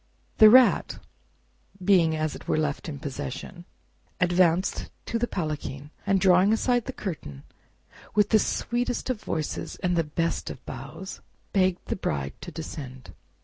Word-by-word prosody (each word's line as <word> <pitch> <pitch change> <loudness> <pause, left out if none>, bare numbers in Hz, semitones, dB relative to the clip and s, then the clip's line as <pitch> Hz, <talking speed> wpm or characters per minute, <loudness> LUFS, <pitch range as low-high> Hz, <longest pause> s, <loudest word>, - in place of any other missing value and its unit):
The 215 - +10
Rat, 255 +2 +5 0.9
being 170 -5 +4
as 155 -1 -1
it - - -12
were - - +1
left 150 +1 -1
in 145 - -5
possession, 145 +5 -6 0.5
advanced 180 0 +2 0.2
to 230 - -2
the 240 - 0
palanquin, 150 - -4 0.2
and 195 0 +3
drawing 185 +2 +5
aside 245 +1 +2
the - - -4
curtain, 70 - -6 0.7
with 210 -1 +4
the 220 - +5
sweetest 245 +4 -1
of 225 -5 -4
voices 155 -2 -3
and 170 -4 0
best 165 -1 -1
of - - -9
bows 145 +9 -8 0.3
begged 185 -2 +2
the - - -2
Bride 70 - -2
to 175 - -7
descend. 135 -5 -8
175 Hz, 145 wpm, -26 LUFS, 150-195 Hz, 0.9 s, The